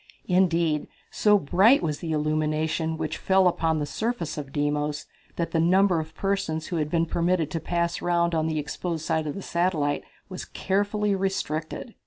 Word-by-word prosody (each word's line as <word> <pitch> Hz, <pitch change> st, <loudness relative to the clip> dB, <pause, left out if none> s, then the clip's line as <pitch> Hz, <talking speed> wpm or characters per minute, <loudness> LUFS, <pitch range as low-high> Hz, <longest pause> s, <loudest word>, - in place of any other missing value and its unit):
Indeed, 170 Hz, -4 st, +2 dB, 0.2 s
so 210 Hz, -1 st, +4 dB
brilliant 195 Hz, -, +4 dB
was 150 Hz, -3 st, -1 dB
the 165 Hz, -2 st, -4 dB
illumination 155 Hz, +1 st, 0 dB
which 155 Hz, -1 st, -3 dB
fell 190 Hz, -1 st, +4 dB
upon 165 Hz, -2 st, +1 dB
the 150 Hz, -, -1 dB
surface 215 Hz, -3 st, -3 dB
of 140 Hz, -2 st, -6 dB
Deimos 145 Hz, +1 st, -1 dB, 0.3 s
that 165 Hz, -1 st, -2 dB
the 165 Hz, -, +1 dB
number 180 Hz, +1 st, +4 dB
of 160 Hz, 0 st, -7 dB
persons 175 Hz, -5 st, -1 dB
who 175 Hz, -, -3 dB
had 150 Hz, -1 st, -1 dB
been 165 Hz, 0 st, +2 dB
permitted 170 Hz, -1 st, 0 dB
to 165 Hz, -, -2 dB
pass 170 Hz, +1 st, -1 dB
around 170 Hz, -1 st, +1 dB
upon 160 Hz, -1 st, +1 dB
the 160 Hz, -1 st, -1 dB
exposed 160 Hz, +2 st, -3 dB
side 160 Hz, -1 st, 0 dB
of 145 Hz, -, -3 dB
the 195 Hz, -, -6 dB
satellite 165 Hz, -5 st, 0 dB, 0.2 s
was 185 Hz, -1 st, -6 dB
carefully 205 Hz, +1 st, 0 dB
restricted. 190 Hz, +1 st, -3 dB
165 Hz, 175 wpm, -26 LUFS, 155-185 Hz, 0.3 s, so